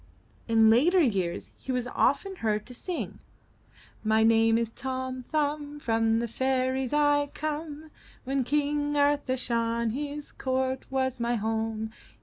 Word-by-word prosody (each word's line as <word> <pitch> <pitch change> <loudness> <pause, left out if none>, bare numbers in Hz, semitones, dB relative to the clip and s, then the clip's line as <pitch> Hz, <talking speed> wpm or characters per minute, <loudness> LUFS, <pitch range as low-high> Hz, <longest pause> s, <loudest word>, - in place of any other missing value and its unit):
In 225 -1 +5
later 325 +11 +5
years 195 - 0
he 265 - -5
was 250 -1 -1
often 385 +9 +1
heard 215 -4 -1
to 250 - -10
sing: 345 +8 -5 0.8
My 220 0 +3
name 225 0 +4
is 230 -1 -1
Tom 260 0 -4
Thumb; 295 -1 -1
From 225 -3 +2
the 235 +1 -1
fairies 260 +1 0
Fve 290 -1 +2
come; 310 0 -4 0.3
When 270 0 0
King 290 +2 0
Arthur 285 -2 +2
shone. 230 -2 0
His 290 +3 -5
court 260 0 -2
was 260 -1 -1
my 235 +1 0
home. 220 0 -2
260 Hz, 135 wpm, -28 LUFS, 230-290 Hz, 0.8 s, In